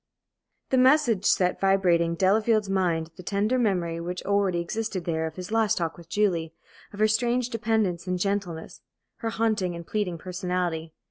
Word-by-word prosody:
The 260 - +4
message 255 -6 +4
set 180 -1 +2
vibrating 180 -4 +3
in - - -3
Delafield's 210 +3 +2
mind 170 -4 0
the - - -8
tender 205 +7 0
memory 180 -7 0
which 180 +2 -5
already 200 -3 +1
existed 195 +1 -3
there 160 -1 -1
of 160 - -8
his 180 +2 -7
last 220 -1 +2
talk 165 -3 -2
with 170 0 -15
Julie, 170 -5 0 0.4
of 205 - -11
her 215 - +5
strange 240 +3 +1
dependence 220 -6 0
and 180 0 0
gentleness, 185 -4 -3 0.4
her 230 - -3
haunting 215 -6 0
and 170 0 -8
pleading 195 -4 -2
personality. 180 -2 -3
190 Hz, 170 wpm, -26 LUFS, 170-215 Hz, 0.4 s, her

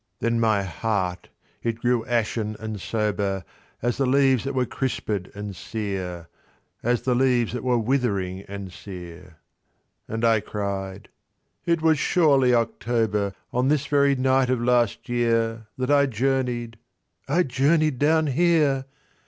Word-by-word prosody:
Then 115 0 +1
my 110 -3 +2
heart 95 -2 -2 0.3
it 115 -1 -2
grew 120 -2 +2
ashen 110 -2 -1
and 110 -3 -5
sober 100 -4 -1 0.4
As 120 0 0
the 135 - +1
leaves 135 -2 +3
that 140 0 -3
were 130 -1 +2
crispèd 110 -8 -3
and 105 -1 -6
sere— 95 -5 -5 0.5
As 120 0 0
the 130 - +1
leaves 125 -3 +2
that 125 - -4
were 125 -1 +2
withering 105 -7 0
and 100 -2 -7
sere— 90 -3 -10 0.7
And 115 +1 -2
I 115 -1 +4
cried—"It 100 - -5
was 160 -2 +4
surely 140 -8 +4
October 115 -4 0 0.2
On 125 +2 +1
this 150 0 +2
very 140 -1 +3
night 130 0 +2
of 130 -1 +1
last 120 -2 +1
year, 115 -2 0
That 130 +2 -1
I 140 -1 +5
journeyed—I 120 - -2
journeyed 145 +1 +2
down 160 +2 +3
here! 150 -2 +2
120 Hz, 135 wpm, -24 LUFS, 105-135 Hz, 0.7 s, I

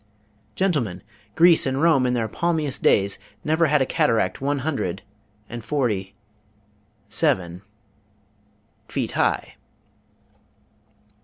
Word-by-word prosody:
Gentlemen, 125 - -1 0.3
Greece 170 -3 +5
and 130 +1 -1
Rome 145 -5 +3
in 125 - 0
their 115 -2 -1
palmiest 160 +1 -1
days 100 0 +2 0.2
never 160 +2 +2
had 150 -2 +3
a - - -2
cataract 110 -6 0
one 140 +1 0
hundred 100 - -2 0.4
and 120 -1 -7
forty 105 -10 -2 0.9
seven 90 -4 0 1.3
feet - - -3
high!'" - - -1
130 Hz, 100 wpm, -23 LUFS, 100-155 Hz, 1.3 s, Greece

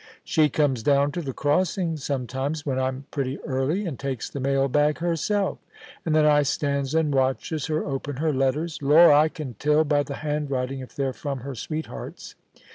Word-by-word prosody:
* - - -28
She 155 -2 +3
comes 135 -4 +1
down 140 +3 +3
to 175 - -3
the 140 -4 -4
crossing 165 +4 0
sometimes 140 +1 -3
when 130 -3 -1
I'm 130 +1 -2
pretty 135 -1 -2
early, 140 +9 -1
and 155 -8 -5
takes 135 -4 -4
the 140 - -5
mail 135 +1 +1
bag 150 +2 +2
herself, 175 +4 0 0.4
and 160 -2 0
then 155 -1 +5
I 150 -1 +5
stands 140 0 -1
and 160 -3 +2
watches 135 +3 0
her 155 0 -1
open 140 0 -4
her 155 +1 0
letters. 140 +5 0
Lor* 155 +5 +7
1 145 - +7
I 150 +2 +5
can 155 -7 -7
tell 150 +1 +3
by 145 -1 +2
the 140 -1 -5
handwriting 135 -3 -2
if 130 - -10
they're 135 -2 -1
fi'om 140 -2 -5
her 135 +2 -6
sweethearts. 155 +6 -6
145 Hz, 195 wpm, -25 LUFS, 135-155 Hz, 0.4 s, Lor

